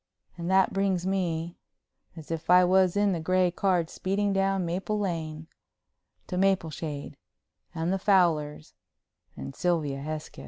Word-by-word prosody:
And 170 0 -5
that 190 0 +3
brings 195 -2 0
me—as 170 -3 -5
if 165 0 -5
I 180 0 +7
was 185 +1 +3
in 205 -1 +3
the 175 - -1
gray 185 +2 +2
car 180 -2 +1
speeding 195 +4 -1
down 195 -1 +1
Maple 185 +5 -2
Lane—to 165 0 -7
Mapleshade 160 -6 -1 0.6
and 165 +3 -1
the 195 - -1
Fowlers 165 -7 +1 0.6
and 70 0 -7
Sylvia 155 -6 -1
Hesketh. 155 +1 -6
175 Hz, 125 wpm, -27 LUFS, 160-190 Hz, 0.6 s, I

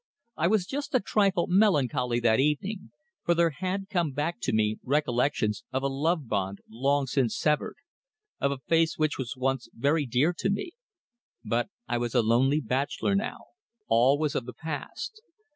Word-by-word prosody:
I 165 - +1
was 205 -1 +2
just 280 +5 -4
a - - +6
trifle 195 -3 +2
melancholy 145 - +2
that 115 0 +3
evening, 150 +9 -1 0.3
for 170 - +2
there 170 -1 +3
had 185 +5 -3
come 175 -8 0
back 150 +1 -2
to - - 0
me 110 0 +1
recollections 125 -6 0
of 130 +1 -1
a - - +2
love 150 +2 0
bond 100 -2 -1
long 135 +5 +1
since 130 -3 0
severed, 150 -1 0 0.6
of 140 - +1
a 140 - -2
face 165 -1 +2
which 155 -2 0
was 130 0 -4
once 130 -1 -1
very 145 +4 +1
dear 130 +8 +2
to - - 0
me. 205 - -2 0.7
But 115 - 0 0.2
I 120 - 0
was 120 +1 -3
a 120 - +4
lonely 130 +7 +3
bachelor 140 - -1
now. 195 +2 -1 0.5
All 125 +5 +5
was 150 -2 0
of 125 - -2
the 125 - -6
past. 160 - -6
145 Hz, 175 wpm, -28 LUFS, 125-170 Hz, 0.7 s, a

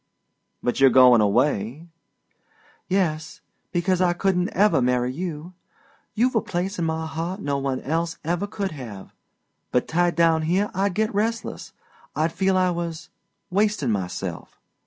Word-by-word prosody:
"But 120 - -1
you're 135 0 +7
goin' 125 -2 +7
away?" 120 +5 +1 1.0
"Yes 160 -5 -1 0.3
because 185 0 +1
I 175 -1 +3
couldn't 180 0 0
ever 185 -7 +3
marry 125 0 +1
you. 170 +1 -5 0.6
You've 245 +4 +2
a 225 - +2
place 190 -2 -3
in 170 - 0
my 160 0 -2
heart 165 +4 -4
no 140 -6 -1
one 135 -1 -2
else 165 +3 -2
ever 175 +5 -1
could 200 -2 -3
have, 115 -10 -9 0.6
but 125 - +1
tied 175 0 +1
down 165 -1 +3
here 185 +6 0
I'd 195 0 0
get 215 0 0
restless. 225 +3 -2 0.4
I'd 160 +1 +1
feel 190 0 +1
I 185 -1 +3
was 170 -2 -5 0.4
wastin' 200 - +1
myself. 95 -4 -4
170 Hz, 145 wpm, -24 LUFS, 140-190 Hz, 1.0 s, you're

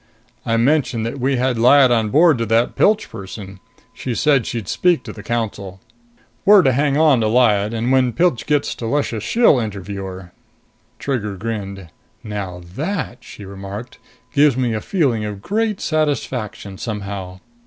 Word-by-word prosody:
"I 115 0 +2
mentioned 125 -2 +1
that 125 +4 -4
we 135 +2 +1
had 125 -1 0
Lyad 130 +2 +6
on 110 -3 +2
board 155 +1 +4
to 115 - 0
that 115 +2 +1
Pilch 215 +1 +3
person. 100 -2 -9 0.3
She 125 -3 -4
said 140 -4 +2
she'd 115 -5 -4
speak 180 -2 +2
to 110 - -8
the 105 - -10
Council. 100 -4 -4 0.6
We're 200 -2 +7
to 135 - +4
hang 140 +2 +1
on 150 -6 +4
to 110 - +1
Lyad 110 -3 +3
and 115 +2 -1
when 130 -2 +3
Pilch 170 -3 +1
gets 150 -1 +1
to 115 - -6
Luscious 120 -4 -1
she'll 230 - +4
interview 100 -3 -5
her." 95 -1 -9 0.6
Trigger 105 -8 -3
grinned. 100 -3 -5 0.3
"Now 100 -4 -5
that," 155 - -3
she 105 - -11
remarked, 100 +4 -8 0.3
"gives 145 -3 +4
me 125 -3 0
a 110 - -2
feeling 135 - 0
of 105 -2 -5
great 210 - -1
satisfaction, 125 - -2
somehow. 100 -4 -5
115 Hz, 165 wpm, -19 LUFS, 105-140 Hz, 0.6 s, We're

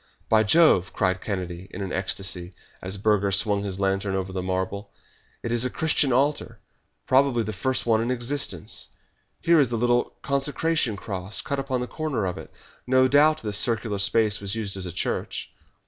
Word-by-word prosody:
"By 110 -1 +5
Jove!" 110 - +4
cried 95 -2 0
Kennedy 90 -3 -4
in 100 0 -6
an 95 - -5
ecstasy, 95 -1 -2 0.3
as 95 +2 -3
Burger 100 -1 +2
swung 100 +1 +1
his 95 -2 -4
lantern 95 0 0
over 95 0 -3
the 95 - -2
marble. 95 +2 -3 0.5
"It 115 - -3
is 120 0 +2
a 130 - 0
Christian 150 -1 +2
altar 140 +4 +1 0.5
probably 130 -3 +3
the 110 0 -4
first 130 +2 -1
one 110 -1 +3
in 115 - -1
existence. 130 +3 -2 0.5
Here 170 -1 +5
is 135 -5 +4
the 120 - -1
little 120 +1 +1
consecration 140 -3 0
cross 95 -1 -5
cut 140 -2 -2
upon 130 -2 -2
the - - -1
corner 150 -10 -2
of 90 - -3
it. - - -11 0.4
No 130 0 +5
doubt 150 +2 +4
this 105 -2 +1
circular 110 -3 0
space 105 +1 +2
was 100 +1 -4
used 105 -3 -3
as 95 -2 -3
a - - -5
church." - - -3
110 Hz, 180 wpm, -25 LUFS, 95-130 Hz, 0.5 s, By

